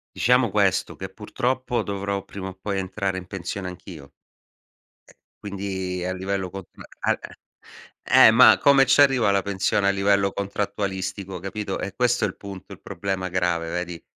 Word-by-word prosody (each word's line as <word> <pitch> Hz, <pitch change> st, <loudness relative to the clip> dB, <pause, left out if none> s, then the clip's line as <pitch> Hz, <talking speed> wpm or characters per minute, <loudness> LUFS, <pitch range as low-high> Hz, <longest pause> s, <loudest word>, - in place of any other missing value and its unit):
Diciamo 125 Hz, -2 st, +3 dB
questo, 100 Hz, -2 st, +1 dB
che -, -, -5 dB
purtroppo 125 Hz, -2 st, -2 dB
dovrò 100 Hz, -1 st, -3 dB
prima 95 Hz, -1 st, -7 dB
o -, -, -9 dB
poi 100 Hz, -1 st, -2 dB
entrare 95 Hz, 0 st, -3 dB
in 90 Hz, -1 st, -7 dB
pensione 95 Hz, 0 st, -5 dB
anch'io. 90 Hz, -4 st, -10 dB
Eh, -, -, -33 dB, 1.3 s
quindi 95 Hz, -2 st, -4 dB
a 90 Hz, -, -2 dB
livello 95 Hz, 0 st, -3 dB
contra 95 Hz, -1 st, -10 dB, 0.2 s
al -, -, +1 dB
eh, -, -, -10 dB, 0.7 s
eh, -, -, +7 dB
ma 120 Hz, +3 st, +7 dB
come 135 Hz, -1 st, +5 dB
ci 135 Hz, +2 st, +5 dB
arrivo 135 Hz, -5 st, +4 dB
alla 100 Hz, -1 st, +3 dB
pensione 100 Hz, +1 st, 0 dB
a -, -, +4 dB
livello 100 Hz, 0 st, +2 dB
contrattualistico, 100 Hz, -1 st, -4 dB
capito, 95 Hz, +2 st, -4 dB
è 100 Hz, -, -5 dB
questo 120 Hz, 0 st, +2 dB
il 95 Hz, -, -4 dB
punto, 100 Hz, -1 st, -10 dB
il 95 Hz, -, -15 dB
problema 95 Hz, 0 st, -4 dB
grave, 85 Hz, -2 st, -1 dB
vedi. 90 Hz, -1 st, -4 dB
100 Hz, 160 wpm, -24 LUFS, 95-105 Hz, 1.3 s, eh